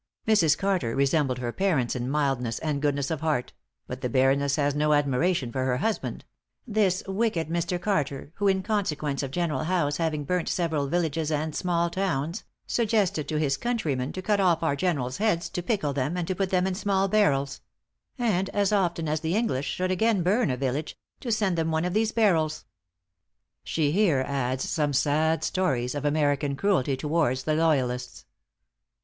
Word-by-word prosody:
Mrs. 170 -9 +4
Carter 185 -13 0
resembled 140 -1 +1
her 120 -1 -3
parents 155 -9 0
in 125 0 -3
mildness 135 -5 0
and 150 -3 -2
goodness 140 -1 0
of 155 -2 -2
heart; 150 -6 -1 0.3
but 125 +1 -7
the 125 - -1
Baroness 135 +2 +2
has 145 -1 +1
no 150 +1 +2
admiration 145 0 +1
for 130 +1 -2
her 125 -1 +1
husband 220 - -2 0.4
"this 205 -5 +1
wicked 195 -5 -1
Mr. 170 +2 -1
Carter, 150 -8 -2
who, 205 - +1
in 190 -1 +2
consequence 155 -10 -1
of 135 - -3
General 155 -2 -1
Howe's 155 -5 0
having 155 -3 -1
burnt 180 +3 -1
several 160 -5 0
villages 160 -1 -1
and 155 0 -2
small 170 -2 0
towns, 170 -1 -2 0.2
suggested 205 -9 0
to 155 - -1
his 140 -3 +1
countrymen 155 - -1
to 185 - -6
cut 210 0 +1
off 175 -4 +2
our 140 -3 +1
generals' 140 -6 -1
heads, 195 -6 0
to 180 - -3
pickle 175 - -1
them, 140 +6 -1
and 175 -2 -2
to 185 - 0
put 190 +1 -1
them 185 -1 +2
in 190 - 0
small 195 0 +1
barrels; 145 -10 +1 0.6
and 200 -6 0
as 205 -1 +1
often 175 -5 +1
as 155 +1 0
the 160 +4 -1
English 175 - 0
should 185 0 -1
again 205 0 +2
burn 200 - +2
a 125 - -1
village 135 +4 -2 0.2
to 240 - -4
send 205 -4 +1
them 160 0 0
one 160 +1 0
of 180 - -2
these 220 +1 +1
barrels." 170 -10 +1 1.0
She 150 - 0
here 165 -8 +3
adds 130 -2 -1
some 150 -3 0
sad 155 +4 +2
stories 130 -10 0
of 145 0 -4
American 145 -1 +1
cruelty 140 -6 +1
towards 145 -3 0
the 155 - 0
loyalists. 130 -6 0
160 Hz, 180 wpm, -26 LUFS, 140-185 Hz, 1.0 s, Mrs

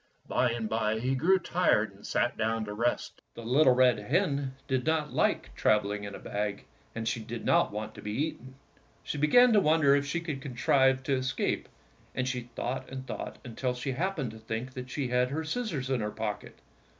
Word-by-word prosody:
By 125 - +2
and 115 -1 -2
by 110 0 0
he 130 +3 0
grew 165 +9 +4
tired 170 - +1
and 100 - -12
sat 120 +1 +1
down 110 0 0
to 105 - -5
rest. 120 +3 -1
The 115 - -8
little 130 +1 +5
red 125 -3 +4
hen 140 - 0
did 130 -1 0
not 155 0 0
like - - +1
travel 105 -1 +2
ing 105 0 -4
in 100 -1 -6
a - - -6
bag, 105 0 -3 0.3
and 115 0 -3
she 115 - 0
did 115 +1 -6
not - - +3
want 105 +1 -5
to - - -11
be 105 - -4
eaten. 130 -1 -3 0.5
She 145 - -4
began 240 - +6
to 210 - +6
wonder 155 -5 +4
if 140 0 0
she 155 +5 -1
could 155 -5 -5
contrive 130 0 +2
to 140 - 0
escape, 130 0 -1 0.5
and 130 0 -1
she 125 -2 -3
thought 130 +2 -3
and 130 0 -6
thought - - -6
until 125 +1 -2
she 125 +2 -3
happened 150 - -2
to 110 - -11
think 110 +4 -5
that 125 0 -7
she 130 -1 -2
had 125 +1 +2
her 155 +4 -2
scis 235 +8 -2
sors 135 -7 -3
in 130 -3 +1
her 105 - -1
pocket. 105 -1 -5
130 Hz, 210 wpm, -29 LUFS, 115-145 Hz, 0.5 s, began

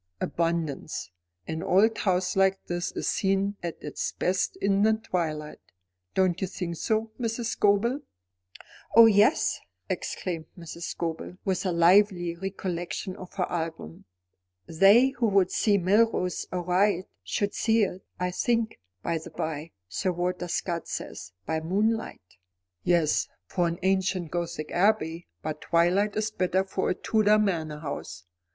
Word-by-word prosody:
"Abundance. 165 - -2 0.4
An 160 0 -3
old 215 +4 +4
house 185 -2 +1
like 195 0 +2
this 175 0 -2
is - - -3
seen 195 +1 +1
at 170 -2 -4
its 150 - -3
best 185 +1 0
in 200 0 +1
the 220 +1 +5
twilight. 160 -8 -3 0.6
Don't 185 -2 +2
you 190 - 0
think 170 -2 -5
so, 220 +5 0
Mrs. 230 -1 -2
Scobel?" 220 +7 +2 0.9
"Oh, 230 0 +10
yes," 215 +6 +4 0.3
exclaimed 165 -4 -3
Mrs. 170 0 -7
Scobel, 165 +2 -4
with 190 -1 0
a - - +1
lively 175 0 +4
recollection 185 -1 -4
of 185 +1 -11
her 190 - 0
album. 160 - -5 0.6
"'They 200 +10 +6
who 240 -2 +2
would 195 -3 +3
see 205 -2 +3
Melrose 190 -1 +2
aright, 180 +1 +1 0.2
should 205 -1 -1
see 225 -1 +2
it' 185 -1 -2 0.2
I 180 0 0
think, 230 +3 0 0.2
by 165 -1 -1
the 160 - -10
bye, 155 0 -4 0.2
Sir 185 - -1
Walter 180 0 -2
Scott 170 0 -2
says, 90 - -6
'by 160 - -1
moonlight.'" 195 - -2 0.5
"Yes, 170 -4 +2 0.2
for 175 -2 0
an 170 0 -2
ancient 190 -3 +1
Gothic 170 -3 -3
abbey; 175 -4 +1 0.2
but 155 0 -4
twilight 180 +5 +2
is 215 0 -1
better 185 -1 +1
for 190 0 -2
a - - +1
Tudor 215 +1 +3
manor 165 -8 0
house. 95 - -6
185 Hz, 140 wpm, -27 LUFS, 170-205 Hz, 0.9 s, Oh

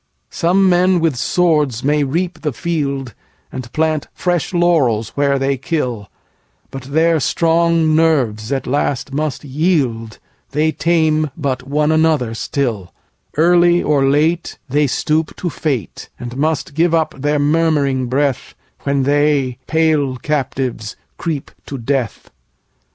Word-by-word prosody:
Some 190 +3 +2
men 180 0 +3
with 160 -4 +1
swords 150 -4 +1
may 145 +1 +2
reap 170 +6 -2
the 150 -4 -2
field, 140 -4 -3 0.4
And 120 -2 -7
plant 155 -1 0
fresh 175 -3 -1
laurels 150 - +2
where 140 -1 +1
they 135 0 0
kill:But 130 - -6
their 160 +4 +2
strong 165 0 +2
nerves 130 -9 +1
at 135 -2 -1
last 140 0 -1
must 150 -1 -2
yield; 135 - -1 0.4
They 155 +2 +2
tame 155 -2 +1
but 130 -4 -3
one 150 +2 +1
another 155 -7 +2
still:Early 145 - 0
or 145 -2 +2
lateThey 145 -1 +1
stoop 155 +5 0
to 175 - -4
fate, 135 - -3
And 120 0 -7
must 150 0 -1
give 165 +2 +2
up 160 -1 0
their 145 +2 0
murmuring 145 -4 +1
breathWhen 135 - -2
they, 140 -3 +1
pale 155 -5 +1
captives, 130 -6 -3 0.2
creep 155 -5 -3 0.2
to 140 - -5
death. 130 -1 -3
145 Hz, 120 wpm, -17 LUFS, 130-160 Hz, 0.4 s, men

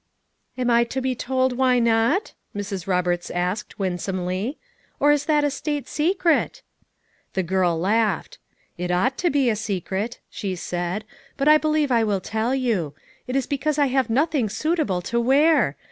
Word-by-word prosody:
"Ani 250 -1 +1
I 235 0 +5
to 255 +3 -3
be 260 0 0
told 260 +1 0
why 255 -1 +4
not?" 235 - +2 0.2
Mrs. 200 -3 -4
Roberts 180 -2 0
asked 180 +4 -3
winsomely, 185 - -2 0.4
"or 290 - +5
is 295 -1 +1
that 300 -2 +2
a 290 - +1
state 290 0 -3
secret?" 335 +1 +1 0.7
The 190 - 0
girl 180 -1 +1
laughed. 220 - 0 0.4
"It 180 0 -2
ought 205 +10 +1
to 350 - +2
be 275 -3 +2
a 225 - +2
secret," 205 +1 -3
she 195 -2 -4
said, 175 +3 -3 0.3
"but 275 +1 0
I 305 0 +7
believe 305 -2 +1
I 230 -2 +4
will 205 -3 0
tell 220 +6 -1
you; 210 - -1 0.3
it 250 - -3
is 270 -2 +1
because 285 +2 -1
I 285 -2 +3
have 265 -2 +2
nothing 275 -1 +1
suitable 305 - -1
to 235 - -1
wear. 270 - +3
235 Hz, 165 wpm, -23 LUFS, 190-285 Hz, 0.7 s, I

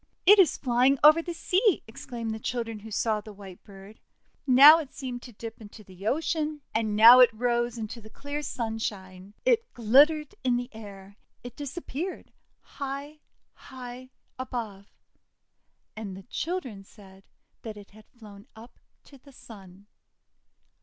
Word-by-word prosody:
'It 410 +3 +7
is 355 -7 +4
flying 255 +2 +2
over 305 +2 +7
the 345 - -6
sea!' 370 +4 +1
exclaimed 230 0 -7
the 220 - -6
children 230 -2 -4
who 220 +2 -11
saw 215 0 -1
the 215 - -12
white 195 -3 -13
bird. 195 +1 -15 0.5
Now 280 +5 +9
it 290 -4 -9
seemed 250 -3 -6
to 245 - -12
dip 225 +1 -10
into 215 +1 -13
the 190 +1 -10
ocean, 305 +1 -1
and 220 -2 -1
now 230 +4 +9
it 250 - +8
rose 240 +1 -1
into 225 +1 -7
the 220 - -14
clear 285 +6 -6
sunshine. 205 -7 -6
It 470 -1 +1
glittered 285 +7 +3
in 250 -2 +1
the 245 +1 -6
air. 200 -2 -12 0.3
It 245 -1 -10
disappeared 300 +4 -6 0.3
high, 280 +2 -7 0.3
high 255 -1 -11 0.3
above. 225 -6 -6 1.1
And 205 -4 -7
the 195 - -12
children 255 - -5
said 195 -1 -18 0.4
that 220 -2 -8
it 205 -1 -14
had 215 +1 -18
flown 210 -2 -15
up 225 +3 -15 0.2
to 275 - -18
the 280 +2 -18
Sun. 195 -6 -15
235 Hz, 150 wpm, -27 LUFS, 210-275 Hz, 1.1 s, Now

